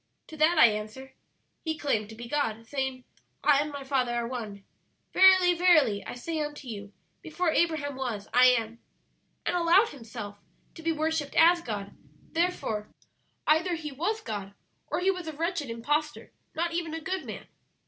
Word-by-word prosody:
To 315 - -10
that 315 +3 +4
I 310 - +9
answer, 220 +5 -2 0.5
'He 315 -1 -2
claimed 220 -10 -1
to 220 - -10
be 235 +1 -8
God, 230 -5 -1
saying, 265 0 -3 0.4
"I 290 -2 +5
and 295 +1 -1
My 285 -1 -6
Father 260 -3 0
are 235 -1 -1
One;" 215 -5 -6 0.5
"Verily, 375 -1 +7
verily, 310 - +4
I - - -7
say 315 +6 -4
unto 295 -2 -6
you, 205 -3 -7 0.3
before 330 +1 -1
Abraham 315 -4 0
was 240 -6 -4
I 250 +1 +7
am;" 230 -2 +1 0.7
and - - 0
allowed 355 +6 +4
himself 220 -6 -8 0.3
to 325 - -11
be 330 0 0
worshipped 315 -2 -1
as 340 +1 +6
God; 205 -7 -5 0.4
therefore 325 -11 -1 0.6
either 340 +3 +3
He 305 -2 -6
was 365 +11 -2
God 200 - -6 0.3
or - - -2
He 385 +1 +3
was 360 -3 -6
a 315 - -4
wretched 330 -2 -2
impostor, 295 +7 -2 0.2
not 335 +1 -1
even 335 -2 -2
a - - -3
good 370 +3 -3
man.' - - -8
290 Hz, 170 wpm, -28 LUFS, 235-335 Hz, 0.7 s, I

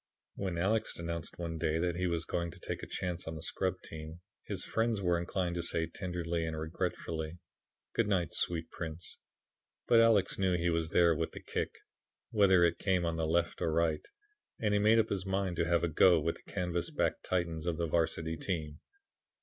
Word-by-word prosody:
When 95 -3 -3
Alex 105 +6 +1
announced 85 -1 -5
one 85 -2 -4
day 80 +1 +1
that 85 0 0
he 90 +1 0
was 85 -1 -1
going 85 -1 -1
to - - -12
take - - -4
a - - -6
chance 90 -2 -3
on 80 - -4
the 80 - -7
scrub 95 +1 -1
team, 80 +2 -8 0.3
his 95 -3 -2
friends 115 -1 +1
were 90 -3 +2
inclined 85 0 -1
to - - 0
say 85 -1 0
tenderly 85 -1 -3
and 80 -1 -3
regretfully, 80 0 -3 0.6
"Good 115 - +2
night, 90 -6 +1
sweet 85 -2 -1
prince." 80 0 -6 0.7
But 115 - +6
Alex 115 -5 +4
knew 95 -2 +2
he 85 0 +1
was 80 -1 0
there 85 0 +5
with 80 +1 -2
the - - -7
kick, - - -3 0.6
whether 95 -4 +5
it 85 0 +2
came 95 -3 +1
on 85 -1 -1
the 80 -1 0
left 85 +1 +1
or 80 - +1
right, 80 -1 +1 0.5
and 105 -2 +1
he 105 - +4
made 110 +2 +5
up 115 - +3
his 95 -1 -2
mind 95 -2 0
to 85 - +2
have 85 -1 +2
a - - +3
go 85 +2 +5
with 80 +2 -1
the - - -16
canvas 90 -3 -1
backed - - 0
Titans 85 -2 -1
of 85 -2 0
the 85 - 0
Varsity 80 0 0
team. 80 -6 -3
85 Hz, 205 wpm, -32 LUFS, 80-95 Hz, 0.7 s, But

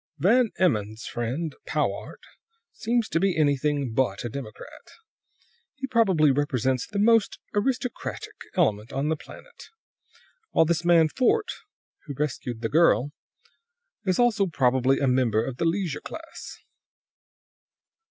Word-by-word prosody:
"Van 230 +6 +3
Emmon's 110 - 0
friend, 135 +7 -3
Powart, - - -2 0.5
seems 230 0 -1
to 165 - 0
be 190 -1 +1
anything 145 -3 +1
but 120 -4 0
a - - -2
democrat. 120 -3 -9 0.9
He 270 -2 -4
probably 195 - +3
represents 130 -3 0
the 200 - -6
most 225 +1 +3 0.2
aristocratic 250 +3 -2 0.2
element 105 +1 +1
on 140 +3 -1
the 160 - +1
planet; - - -13 0.9
while 160 - +5
this 170 +1 0
man 170 -2 +5
Fort, 410 - +1 0.5
who 145 -3 -6
rescued 125 -5 -3
the 115 - 0
girl, 150 -3 +3 0.9
is 185 -3 +1
also 225 -5 +3
probably 130 -3 +2
a 140 - +1
member 120 -4 +2
of 130 -2 -5
the 170 - -1
leisure 165 -3 -1
class. 325 0 -9
150 Hz, 125 wpm, -25 LUFS, 130-200 Hz, 0.9 s, while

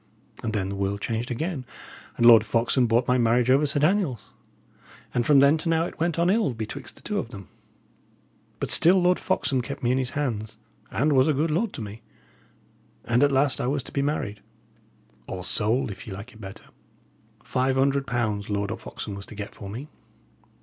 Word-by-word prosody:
And 115 - -2
then 95 -3 -1
the 100 - -4
world 100 +1 -2
changed 115 +3 -3
again, 145 +3 -3 0.5
and 120 - +2
Lord 115 -3 +9
Foxham 120 +3 +1
bought 120 +2 +2
my 125 0 +3
marriage 120 +2 +3
over 140 +3 +4
Sir 140 +1 0
Daniel's; 155 - +1 0.9
and 120 -1 0
from 145 -2 +6
then 140 +3 +5
to 165 - -3
now 165 0 +2
it - - -8
went 170 0 0
on 170 +2 +3
ill 210 - +1
betwixt 115 +5 -6
the - - -17
two 210 -1 -2
of 115 - -5
them. 100 -6 -10 1.1
But - - -2
still 185 +3 +5
Lord 180 0 +3
Foxham 130 -3 0
kept 140 +2 -7
me 120 - +2
in 130 - +2
his 130 -1 0
hands, 110 -6 -3 0.3
and 150 +3 +1
was 130 +1 +4
a 155 - +2
good 155 +3 0
lord 195 +7 0
to 115 - -5
me. 105 +2 -9 1.0
And 120 +3 +2
at 145 - +4
last 135 0 +2
I - - -1
was 140 0 -1
to - - -11
be 140 - -1
married 110 -8 -2 0.9
or 90 -1 -5
sold, 115 +6 +1
if 100 - -10
ye 100 - -6
like 100 +6 -9
it 110 - -15
better. 95 -1 -10 0.8
Five 130 +1 0
hundred 140 +1 +1
pounds 110 -5 -1
Lord 100 -1 -1
Foxham 100 - -7
was 100 0 -8
to - - -10
get 105 0 -7
for 100 - -9
me. 125 +8 -7
125 Hz, 205 wpm, -25 LUFS, 110-145 Hz, 1.1 s, Lord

